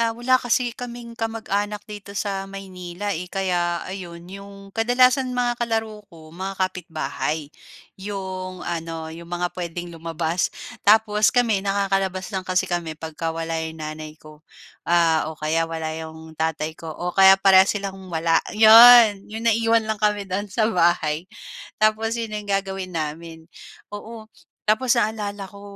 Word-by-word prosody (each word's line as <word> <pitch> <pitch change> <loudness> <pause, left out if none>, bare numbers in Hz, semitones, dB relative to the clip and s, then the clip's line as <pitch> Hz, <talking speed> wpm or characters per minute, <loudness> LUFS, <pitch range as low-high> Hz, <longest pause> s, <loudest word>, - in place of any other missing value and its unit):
ah, 230 -1 0
wala 255 +2 +3
kasi 245 0 0
kaming 240 -1 -8
kamag-anak 210 -2 -3
dito 205 -1 -10
sa 195 -1 -3
Maynila, 190 0 -6
eh, 180 +1 -5
kaya 175 -3 -1
ayon 175 -3 -8
'yong 195 +1 -11
kadalasan 250 +4 +3
mga 240 -1 0
kalaro 225 -2 -2
ko 160 -4 -15
mga 190 +2 -5
kapitbahay 155 -4 -4 0.5
yung 185 -2 -6
ano 165 -1 -5
'yong 170 +1 -11
mga 175 0 -2
puwedeng 175 -1 -6
lumabas. 165 +1 -2 0.4
Tapos 215 0 +5
kami 235 -5 +2
nakakalabas 195 -1 -1
lang 190 -1 -4
kasi 185 +1 +2
kami 175 -4 -3
pagka 160 +1 -5
wala 165 0 -3
'yong 160 0 -5
nanay 155 0 -7
ko, 155 -1 -16 0.5
ah, 165 -2 +3
o 160 - -8
kaya 165 +2 0
wala 160 -1 -4
'yong 160 0 -8
tatay 160 0 -2
ko 165 +1 -10
o 175 0 -3
kaya 195 0 +7
parehas 190 0 +6
silang 195 -2 -6
wala. 165 -1 +2 0.2
'Yon 225 -2 +8
yung 220 +2 -6
naiwan 230 0 +3
lang 215 -1 -3
kami 210 -1 +1
do'n 195 +2 -3
sa 215 +3 0
bahay 170 -2 +1 0.5
tapos 220 +2 +1
'yon 225 -2 -4
yung 205 -1 -5
gagawin 195 -1 -2
namin. 160 0 -5 0.5
Oo, 220 +1 -9 0.4
tapos 240 +2 +3
naalala 210 -2 -3
ko 200 +1 -14
190 Hz, 150 wpm, -23 LUFS, 165-215 Hz, 0.5 s, Yon